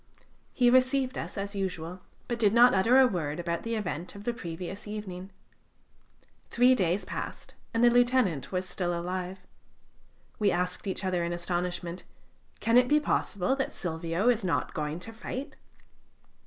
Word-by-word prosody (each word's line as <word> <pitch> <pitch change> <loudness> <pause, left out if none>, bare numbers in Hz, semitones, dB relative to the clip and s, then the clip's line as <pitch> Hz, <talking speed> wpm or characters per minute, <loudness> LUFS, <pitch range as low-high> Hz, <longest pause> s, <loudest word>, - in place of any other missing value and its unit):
He 245 -1 +4
received 255 +1 +3
us - - -5
as 200 +1 -3
usual, 180 -2 -4 0.3
but 240 -1 -2
did 215 -1 +3
not 245 +1 +7
utter 225 +7 +4
a 265 - +8
word 170 -9 -2
about 170 -1 -2
the 230 0 -2
event 180 -5 -4
of 200 - -9
the 240 - -1
previous 180 0 -6
evening. 195 -3 -6 1.2
Three 250 +2 +5
days 185 -3 +1
passed, - - -6 0.2
and 230 +1 +1
the 240 - +8
lieutenant 240 - +2
was 185 0 -2
still 175 -2 -2
alive. 180 +1 -4 1.0
We 210 -2 +3
asked 180 +2 -1
each 190 0 -3
other 180 -2 0
in 170 0 -2
astonishment: 175 0 -3 0.6
"Can 230 +1 +3
it 250 - +2
be 300 +3 +4
possible 260 -5 0
that 270 - -1
Silvio 165 +3 -2
is 235 -3 +3
not 180 - -1
going 150 +1 -3
to 225 - -8
fight?" 255 +5 -6
190 Hz, 160 wpm, -29 LUFS, 175-235 Hz, 1.2 s, a